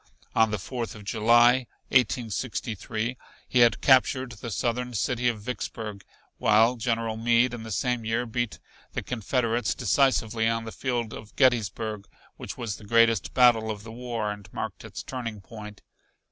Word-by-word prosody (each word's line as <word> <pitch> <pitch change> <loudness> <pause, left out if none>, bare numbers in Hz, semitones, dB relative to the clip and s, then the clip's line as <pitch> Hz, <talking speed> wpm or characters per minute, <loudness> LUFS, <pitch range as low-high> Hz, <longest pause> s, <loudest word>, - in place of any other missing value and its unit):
On 110 0 +4
the 105 - -1
Fourth 115 +4 -5
of 105 - -10
July, 120 +4 +4 0.2
1863, 115 0 -1 0.3
he 125 - +2
had 120 -3 +5
captured 130 -1 +4
the 120 +1 -7
Southern 120 +2 -2
city 125 +3 0
of 115 -3 0
Vicksburg, 105 -3 -5 0.4
while 110 +3 +4
General 115 -2 -1
Meade 120 +2 +3
in 120 - -5
the 110 - -8
same 125 +3 -1
year 115 +2 0
beat 120 -1 -2 0.4
the - - -3
Confederates 120 0 -1
decisively 115 -5 +2
on 115 0 0
the 110 - -6
field 120 -3 -2
of 105 -1 -10
Gettysburg 110 -5 +1 0.3
which - - -7
was 115 -5 -4
the - - -14
greatest 115 0 +3
battle 120 -3 +5
of 105 -1 -5
the 110 - -9
war 115 -3 -3
and 100 -1 -10
marked - - -5
its - - -7
turning 115 -5 -5
point. 105 +1 -11
115 Hz, 160 wpm, -26 LUFS, 110-125 Hz, 0.4 s, had